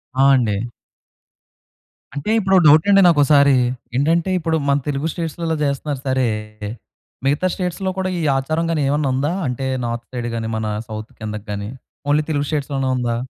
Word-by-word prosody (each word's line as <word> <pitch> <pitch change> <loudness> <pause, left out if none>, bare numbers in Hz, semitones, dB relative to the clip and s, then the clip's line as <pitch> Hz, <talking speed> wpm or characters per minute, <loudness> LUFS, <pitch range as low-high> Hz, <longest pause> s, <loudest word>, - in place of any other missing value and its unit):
ఆ! 135 +1 +4
అండి. 115 -6 +1 1.6
అంటే 145 +10 -3
ఇప్పుడు 190 -2 +2
డౌటండి 160 +7 +6
నాకోసారి. 145 -3 +5 0.4
ఏంటంటే 165 +7 +2
ఇప్పుడు 165 -1 0
మన 140 - +4
తెలుగు 145 +2 -1
స్టేట్స్‌లో 165 -1 -3
చేస్తున్నారు 140 0 -2
సరే. 130 -1 +2 1.0
మిగతా 145 +6 +2
స్టేట్స్‌లో 185 +1 -2
కూడా 190 0 -1
ఈ - - -2 0.2
ఆచారం 155 +5 -1
గాని 155 -3 0
ఏమైనా 145 0 +1
ఉందా? 140 +5 0 0.2
అంటే 125 +1 -3 0.2
నార్త్ 120 0 -4
సైడ్ 120 -1 -3
గాని 115 -1 -3
మన 110 - -3 0.2
సౌత్ 110 0 -7
కిందగ్గాని 105 -1 -5 0.4
ఓన్లీ 150 +1 +3
తెలుగు 145 -1 0
స్టేట్స్‌లోనే 140 -3 -1
ఉందా? 120 -1 -1
140 Hz, 145 wpm, -20 LUFS, 125-160 Hz, 1.6 s, డౌటండి